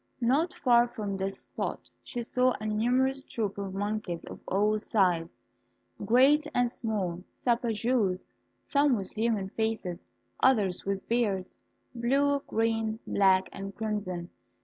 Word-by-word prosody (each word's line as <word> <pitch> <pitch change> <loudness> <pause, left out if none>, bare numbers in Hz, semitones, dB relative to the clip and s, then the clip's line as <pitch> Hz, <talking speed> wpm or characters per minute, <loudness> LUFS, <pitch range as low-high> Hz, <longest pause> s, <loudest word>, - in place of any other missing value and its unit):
Not 285 +9 +2
far 240 -1 +4
from 210 -4 -4
this 195 0 -3
spot - - -5
she 245 -3 -5
saw 255 +2 +2
a 215 - -6
numerous 250 +5 +1
troop 210 -7 -3
of 195 -1 -4
monkeys 205 -4 -3
of - - -9
all 210 +2 +2
sizes, 180 -6 +1 0.7
great 275 +6 +5
and 245 -1 +2
small, 195 -8 -2 0.2
sapajous, 230 -4 +1 0.4
some 285 -2 +3
with 195 -2 -4
human 220 -3 0
faces, 220 -5 -2 0.4
others 205 -8 +3
with 195 0 -2
beards, 205 -6 -1 0.3
blue, 275 +4 +2
green, 225 -1 0
black, 190 -1 +3
and 195 0 -7
crimson. 205 -5 -3
220 Hz, 125 wpm, -29 LUFS, 195-245 Hz, 0.7 s, great